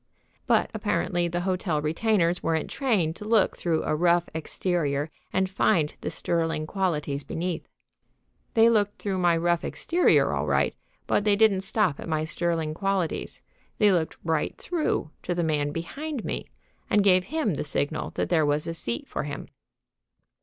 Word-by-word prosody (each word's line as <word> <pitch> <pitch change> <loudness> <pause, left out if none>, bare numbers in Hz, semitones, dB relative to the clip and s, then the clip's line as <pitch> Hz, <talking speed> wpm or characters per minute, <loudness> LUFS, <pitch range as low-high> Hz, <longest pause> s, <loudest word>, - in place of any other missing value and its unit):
But - - +3
apparently 175 -2 0
the 175 +1 -2
hotel 180 -4 0
retainers 170 +3 +1
weren't 160 -1 -1
trained 205 - +1
to - - -8
look 215 -2 +3
through 165 -2 0
a - - 0
rough 175 +1 +3
exterior 155 -2 -1 0.2
and 190 0 +1
find 165 -5 +2
the - - -2
sterling 165 -2 -1
qualities 150 -6 -1
beneath. 170 +3 -3 0.9
They 225 0 +7
looked 210 -3 +2
through 195 -2 -2
my 175 -2 +3
rough 170 0 +1
exterior 345 +1 +2
all - - -1
right, - - +2 0.3
but - - +1
they 205 -1 +4
didn't 205 -3 +4
stop 195 -5 +1
at - - -7
my 155 -1 0
sterling 165 -1 -1
qualities. 195 -1 -2 0.3
They 210 -2 +5
looked 170 -4 0
right 160 -2 -1
through 310 - -1
to 175 - -2
the 175 - 0
man 150 -2 +1
behind 270 - -5
me, - - -3 0.4
and 205 - +4
gave 185 -2 +4
him 310 - 0
the - - -2
signal 150 +1 -2
that - - -1
there 165 -3 +3
was 145 +1 +1
a 165 - -2
seat 115 -8 -4
for - - -3
him. 145 -1 -6
175 Hz, 165 wpm, -26 LUFS, 155-195 Hz, 0.9 s, They